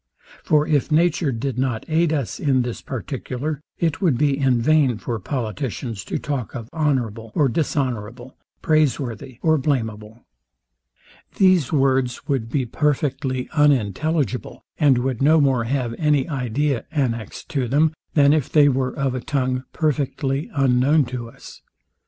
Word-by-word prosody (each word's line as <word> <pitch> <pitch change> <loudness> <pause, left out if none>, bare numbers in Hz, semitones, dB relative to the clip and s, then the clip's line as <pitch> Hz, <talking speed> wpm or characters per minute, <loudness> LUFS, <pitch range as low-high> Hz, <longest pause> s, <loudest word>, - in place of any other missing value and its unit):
For 150 -1 +3
if 150 -1 +1
nature 160 -1 +2
did 125 +1 -3
not 130 -4 -1
aid 165 0 +2
us 140 -7 -2
in 135 -4 +2
this 120 -1 -5
particular, 135 +3 -4 0.2
it 165 0 -1
would 165 -10 +2
be 145 0 +2
in 135 -3 +2
vain 135 -2 +3
for 115 +1 -4
politicians 115 -2 -4
to - - -2
talk 140 -6 -4
of 115 -2 -7
honourable 120 -8 -1
or 145 - +3
dishonourable, 125 -4 -2 0.3
praiseworthy 135 -6 0
or 160 -2 +3
blameable. 110 -5 -3 1.1
These 185 -8 +3
words 135 -3 +1
would 130 -6 -1
be 130 +1 0
perfectly 135 -1 -1
unintelligible, 145 - 0 0.2
and 145 -5 +4
would 125 0 -2
no 155 +3 +5
more 135 -5 +2
have 125 -1 -1
any 150 -4 +2
idea 135 -2 -1
annexed 120 -8 -3
to 135 -5 -1
them, 150 +5 +2 0.2
than 145 -1 +5
if 155 -4 0
they 150 -2 +6
were 130 -1 -1
of 135 -2 0
a 130 - -3
tongue 130 -2 -1
perfectly 140 -2 -1
unknown 135 +2 +3
to 120 -1 -6
us. - - -14
135 Hz, 145 wpm, -22 LUFS, 125-150 Hz, 1.1 s, they